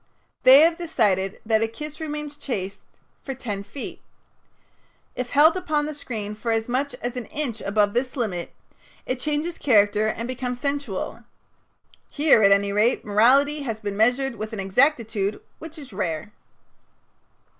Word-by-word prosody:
They 265 Hz, +2 st, +9 dB
have 330 Hz, +1 st, +4 dB
decided 205 Hz, -, 0 dB
that 220 Hz, 0 st, +2 dB
a 225 Hz, -, +2 dB
kiss 300 Hz, +7 st, -8 dB
remains 300 Hz, -1 st, -5 dB
chaste 200 Hz, -9 st, -5 dB, 0.4 s
for 270 Hz, -, -5 dB
ten 210 Hz, -6 st, -5 dB
feet. 205 Hz, +7 st, -8 dB, 1.1 s
If 250 Hz, -1 st, -4 dB
held 305 Hz, +4 st, +5 dB
upon 310 Hz, -5 st, -1 dB
the 305 Hz, -, -4 dB
screen 220 Hz, -8 st, -5 dB
for 215 Hz, +2 st, -5 dB
as 225 Hz, 0 st, 0 dB
much 265 Hz, +3 st, -1 dB
as 245 Hz, +1 st, -3 dB
an 250 Hz, -2 st, -5 dB
inch 255 Hz, -7 st, -4 dB
above 205 Hz, 0 st, +1 dB
this 255 Hz, +3 st, -1 dB
limit, 190 Hz, -8 st, -3 dB, 0.5 s
it 255 Hz, 0 st, -3 dB
changes 300 Hz, +4 st, -2 dB
character 210 Hz, -4 st, +3 dB
and 230 Hz, +2 st, -3 dB
becomes 250 Hz, -1 st, -4 dB
sensual. 280 Hz, -7 st, -3 dB, 0.9 s
Here, 290 Hz, -6 st, +4 dB
at 200 Hz, -1 st, +6 dB
any 200 Hz, 0 st, +3 dB
rate, 215 Hz, +4 st, +2 dB
morality 270 Hz, +8 st, +4 dB
has 225 Hz, -6 st, -4 dB
been 205 Hz, -2 st, -4 dB
measured 245 Hz, +4 st, +2 dB
with 215 Hz, +2 st, -6 dB
an 215 Hz, -, -4 dB
exactitude 210 Hz, -1 st, +1 dB, 0.2 s
which 325 Hz, +1 st, -10 dB
is 280 Hz, -8 st, -11 dB
rare. 185 Hz, +1 st, -3 dB
240 Hz, 155 wpm, -24 LUFS, 210-285 Hz, 1.1 s, They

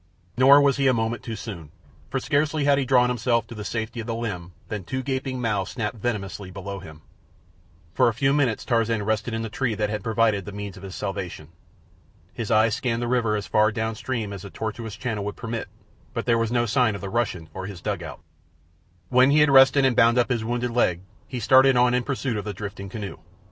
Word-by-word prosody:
Nor 135 Hz, +3 st, +7 dB
was 140 Hz, -1 st, +3 dB
he 135 Hz, -1 st, +2 dB
a 130 Hz, -, +4 dB
moment 115 Hz, 0 st, -1 dB
too 115 Hz, -, -5 dB
soon, 95 Hz, -9 st, -8 dB, 0.4 s
for 135 Hz, -, -1 dB
scarcely 145 Hz, +2 st, 0 dB
had 140 Hz, -1 st, +4 dB
he 135 Hz, -, 0 dB
drawn 125 Hz, -1 st, +4 dB
himself 120 Hz, -1 st, +1 dB
to 115 Hz, -, -10 dB
the 105 Hz, -2 st, -6 dB
safety 115 Hz, +2 st, -4 dB
of 115 Hz, -, -5 dB
the 115 Hz, -, -2 dB
limb 90 Hz, -7 st, -5 dB
than 105 Hz, -3 st, -4 dB
two 130 Hz, +9 st, -4 dB
gaping 130 Hz, -1 st, -3 dB
mouths 105 Hz, -5 st, -1 dB
snapped 115 Hz, -1 st, -3 dB
venomously 100 Hz, -3 st, -3 dB
below 100 Hz, +1 st, -6 dB
him. 80 Hz, -3 st, -12 dB, 0.9 s
For 80 Hz, -, +4 dB
a 115 Hz, -, +2 dB
few 135 Hz, +3 st, +2 dB
minutes 135 Hz, -7 st, +1 dB
Tarzan 115 Hz, -2 st, +1 dB
rested 110 Hz, +2 st, -1 dB
in 115 Hz, -, -2 dB
the -, -, -3 dB
tree 120 Hz, 0 st, -1 dB
that 105 Hz, 0 st, -1 dB
had 105 Hz, -2 st, -3 dB
proved 110 Hz, -3 st, +1 dB
the 105 Hz, -, -6 dB
means 100 Hz, -1 st, -6 dB
of 95 Hz, -, -12 dB
his 95 Hz, -2 st, -8 dB
salvation. 90 Hz, -6 st, -5 dB, 0.8 s
His 115 Hz, -3 st, -5 dB
eyes 110 Hz, 0 st, +4 dB
scanned 120 Hz, 0 st, -1 dB
the -, -, -1 dB
river 120 Hz, -3 st, +1 dB
as 105 Hz, -1 st, -3 dB
far 110 Hz, +1 st, +3 dB
down 110 Hz, +1 st, -2 dB
stream 110 Hz, -2 st, -4 dB
as 100 Hz, -, -7 dB
the 100 Hz, -, -8 dB
tortuous 110 Hz, +1 st, -5 dB
channel 110 Hz, -3 st, -3 dB
would 105 Hz, 0 st, -4 dB
permit, 115 Hz, 0 st, -4 dB, 0.5 s
but -, -, -2 dB
there 115 Hz, -1 st, +3 dB
was 115 Hz, 0 st, 0 dB
no 120 Hz, -1 st, +2 dB
sign 115 Hz, -2 st, +2 dB
of -, -, -7 dB
the 100 Hz, -, -5 dB
Russian 100 Hz, -8 st, -1 dB
or 95 Hz, 0 st, -5 dB
his 100 Hz, -4 st, -8 dB
dugout. -, -, -5 dB, 0.9 s
When 130 Hz, +2 st, +5 dB
he 150 Hz, +2 st, +5 dB
had 150 Hz, -1 st, +5 dB
rested 135 Hz, 0 st, +7 dB
and 130 Hz, -2 st, +2 dB
bound 115 Hz, +2 st, +5 dB
up 125 Hz, -, +3 dB
his 115 Hz, -2 st, 0 dB
wounded 120 Hz, +1 st, -2 dB
leg 90 Hz, -8 st, +1 dB, 0.3 s
he 125 Hz, -, -5 dB
started 130 Hz, +3 st, +5 dB
on 125 Hz, 0 st, +4 dB
in 125 Hz, -, +2 dB
pursuit 130 Hz, -2 st, -2 dB
of 105 Hz, -, -3 dB
the 105 Hz, -, -3 dB
drifting 100 Hz, 0 st, -7 dB
canoe. 100 Hz, -1 st, -6 dB
115 Hz, 225 wpm, -24 LUFS, 105-125 Hz, 0.9 s, Nor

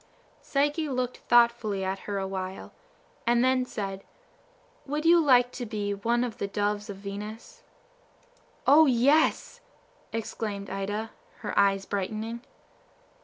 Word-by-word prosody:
Psyche 295 Hz, +2 st, 0 dB
looked 250 Hz, -1 st, -2 dB
thoughtfully 235 Hz, -4 st, +3 dB
at 190 Hz, +1 st, -2 dB
her 200 Hz, -, -1 dB
a 195 Hz, -1 st, -2 dB
while, 190 Hz, 0 st, -6 dB, 0.5 s
and 240 Hz, 0 st, +4 dB
then 260 Hz, 0 st, +3 dB
said, 195 Hz, -3 st, -5 dB, 0.8 s
"Would 300 Hz, +3 st, -2 dB
you 340 Hz, +1 st, +7 dB
like 250 Hz, -3 st, +5 dB
to 245 Hz, -, -5 dB
be 205 Hz, -2 st, -2 dB
one 235 Hz, +4 st, 0 dB
of 245 Hz, -1 st, -5 dB
the 200 Hz, -, -1 dB
Doves 205 Hz, +1 st, -2 dB
of 200 Hz, -, -6 dB
Venus?" 205 Hz, +3 st, -8 dB, 1.0 s
"O, 310 Hz, +2 st, +7 dB
yes!" 275 Hz, +5 st, +2 dB, 0.5 s
exclaimed 210 Hz, -3 st, -4 dB
Ida, 205 Hz, +3 st, -3 dB, 0.3 s
her -, -, -4 dB
eyes 195 Hz, -1 st, +3 dB
brightening. 215 Hz, +4 st, -3 dB
220 Hz, 125 wpm, -27 LUFS, 200-250 Hz, 1.0 s, you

